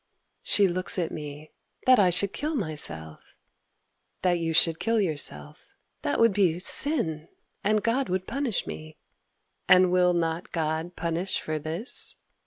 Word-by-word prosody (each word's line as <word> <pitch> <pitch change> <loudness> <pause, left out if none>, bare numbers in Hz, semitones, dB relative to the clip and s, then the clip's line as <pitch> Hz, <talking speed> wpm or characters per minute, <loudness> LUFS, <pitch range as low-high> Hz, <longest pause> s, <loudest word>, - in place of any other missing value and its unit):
She 200 -1 +2
looks 185 +2 0
at 170 -3 -1
me. 150 0 -8 0.3
"That 255 -2 +6
I 190 -3 +5
should 195 +3 +2
kill 305 +2 -3
myself?"— 115 - -5 0.9
"That 175 -2 +2
you 165 -1 -2
should 165 0 +3
kill 230 0 +1
yourself."—"That 145 - -3
would 230 -2 +4
be 185 -5 +2
sin, 175 - +1 0.4
And 210 +1 +1
God 235 0 0
would 185 +1 -2
punish 270 -7 -2
me!"—"And 175 +3 -1
will 180 -1 +3
not 165 0 -2
God 160 +1 -3
Punish 170 +3 -1
for 155 0 -4
this?" 165 - -2
175 Hz, 135 wpm, -26 LUFS, 160-200 Hz, 0.9 s, That